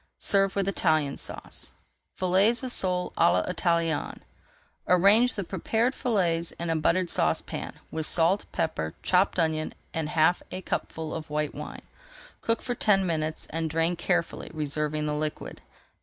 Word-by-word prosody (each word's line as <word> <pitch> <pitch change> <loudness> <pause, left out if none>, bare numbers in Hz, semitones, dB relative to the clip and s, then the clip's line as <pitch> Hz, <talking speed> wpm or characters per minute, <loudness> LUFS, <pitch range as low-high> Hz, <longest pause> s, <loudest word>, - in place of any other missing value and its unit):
Serve 195 -1 +3
with 195 -1 0
Italian 155 -7 +1
Sauce. - - -8 0.4
FILLETS 195 +7 +3
OF 255 - -3
SOLE 180 -1 0
À - - +6 0.2
L'ITALIENNE 170 -2 0 0.7
Arrange 200 +7 +5
the 200 - -2
prepared 220 +7 0
fillets 175 -11 0
in 170 0 -3
a - - +1
buttered 170 +3 +2
saucepan, - - -1 0.2
with 160 -1 -1
salt, 175 +4 +3
pepper, 80 - -2
chopped 185 +1 +2
onion, 160 -2 0 0.2
and 160 -2 -2
half 160 +3 +3
a 185 - -5
cupful 160 -2 -3
of 160 -1 -6
white 150 0 -1
wine. - - -8 0.6
Cook 230 0 0
for 245 - -2
ten 195 -5 +3
minutes 155 -2 -2
and 165 0 -2
drain 165 +2 +1
carefully, 175 0 -1
reserving 150 0 -1
the 150 - -1
liquid. 150 0 -4
170 Hz, 145 wpm, -27 LUFS, 155-195 Hz, 0.7 s, À